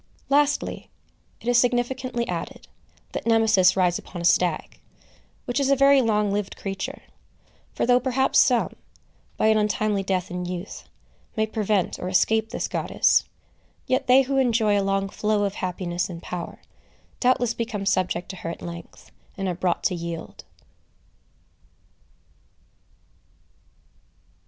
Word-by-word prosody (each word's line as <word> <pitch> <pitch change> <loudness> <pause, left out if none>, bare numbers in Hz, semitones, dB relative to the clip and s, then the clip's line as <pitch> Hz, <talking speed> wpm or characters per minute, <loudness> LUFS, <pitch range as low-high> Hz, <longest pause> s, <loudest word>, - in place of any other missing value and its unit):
Lastly, 290 +1 +1 0.5
it - - -10
is 245 -1 +5
significantly 245 0 0
added, - - -5 0.4
that - - -5
Nemesis 220 -5 +4
rides 180 -2 +2
upon 175 - -9
a 170 - -3
stag, 175 -2 +1 0.7
which 245 +3 -1
is 275 -1 +1
a 275 - +5
very 275 0 +5
long 210 -3 +1
lived 205 -1 -3
creature; 195 -1 -5 0.7
for - - -1
though 245 +1 +4
perhaps 265 +1 +2
some, 245 -3 +3 0.6
by - - +1
an 220 0 +4
untimely 210 -1 0
death 185 -2 -2
in 180 0 -4
youth, 180 +2 -7 0.5
may 220 - +1
prevent 215 -3 -1
or 180 - -4
escape 220 +4 +2
this - - -3
goddess, - - +2 0.6
yet 260 +1 0
they 260 +2 +6
who 270 +1 -1
enjoy 225 -5 +2
a 200 - +2
long 195 0 0
flow 210 +1 0
of 200 -1 -1
happiness 180 -1 -3
and 170 -1 -8
power, 175 -1 -7 0.6
doubtless 245 -2 +2
become 225 -4 -4
subject 185 -2 0
to 190 - -7
her 165 - -5
at 170 - -7
length, 170 0 -10 0.3
and 195 -1 -2
are 180 - 0
brought 175 0 -1
to - - +1
yield. 170 -1 -6
210 Hz, 140 wpm, -24 LUFS, 185-245 Hz, 0.7 s, they